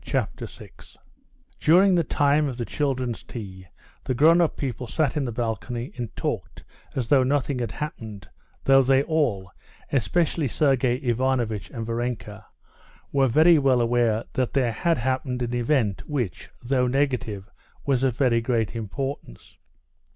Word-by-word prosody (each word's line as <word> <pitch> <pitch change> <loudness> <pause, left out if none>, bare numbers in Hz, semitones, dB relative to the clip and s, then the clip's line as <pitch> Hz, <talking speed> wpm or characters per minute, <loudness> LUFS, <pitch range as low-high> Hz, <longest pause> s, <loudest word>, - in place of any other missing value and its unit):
Chapter - - -2
6 - - -14 0.6
During 185 +5 +5
the 175 -2 +3
time 145 +1 +2
of 130 -3 -5
the 120 - -3
children's 130 -5 -2
tea 95 -5 -9 0.4
the 130 - -2
grown 165 +6 +5
up 165 - +1
people 125 -3 -4
sat 155 +3 0
in 145 -3 0
the 120 - -3
balcony 120 +1 -4
and 120 -3 -4
talked - - -4 0.3
as 125 -3 -1
though 140 0 +5
nothing 135 0 0
had 120 -3 -3
happened, 110 -9 -7 0.4
though 135 0 +6
they 135 +1 +3
all, 125 - 0 0.4
especially 155 +3 +1
Sergey 130 -2 +2
Ivanovitch 120 -6 -1
and 115 -1 -5
Varenka, 115 -3 -4 0.6
were 135 -1 +3
very 155 +6 +5
well 135 -3 +3
aware 115 -2 +2
that 130 -2 -1
there 130 -4 +2
had 165 +9 0
happened 130 0 -1
an 120 0 -3
event 120 -4 0
which, 120 - -3
though 125 0 +1
negative, 125 -7 -1 0.4
was 135 -3 +1
of 130 -3 +1
very 120 -4 +3
great 115 -2 -1
importance. 115 - -6
125 Hz, 150 wpm, -25 LUFS, 115-140 Hz, 0.6 s, though